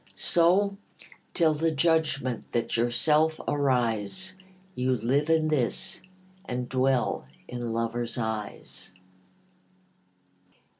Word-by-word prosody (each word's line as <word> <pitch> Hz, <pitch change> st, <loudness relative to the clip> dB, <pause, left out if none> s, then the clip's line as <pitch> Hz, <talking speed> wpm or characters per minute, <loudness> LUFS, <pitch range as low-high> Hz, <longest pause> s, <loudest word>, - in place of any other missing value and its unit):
So, 190 Hz, +4 st, +3 dB, 0.6 s
till 165 Hz, -3 st, +4 dB
the 160 Hz, +2 st, +1 dB
judgment 155 Hz, -6 st, 0 dB
that 120 Hz, -1 st, 0 dB
yourself 150 Hz, +7 st, +2 dB
arise, 130 Hz, -, 0 dB, 0.4 s
You 130 Hz, -4 st, 0 dB
live 135 Hz, +7 st, 0 dB
in 160 Hz, -1 st, +3 dB
this, 155 Hz, +6 st, -1 dB, 0.4 s
and 125 Hz, 0 st, -3 dB
dwell 130 Hz, 0 st, 0 dB, 0.2 s
in 120 Hz, -1 st, -4 dB
lover's 115 Hz, +1 st, -2 dB
eyes. 110 Hz, -4 st, -5 dB
130 Hz, 90 wpm, -27 LUFS, 120-160 Hz, 0.6 s, till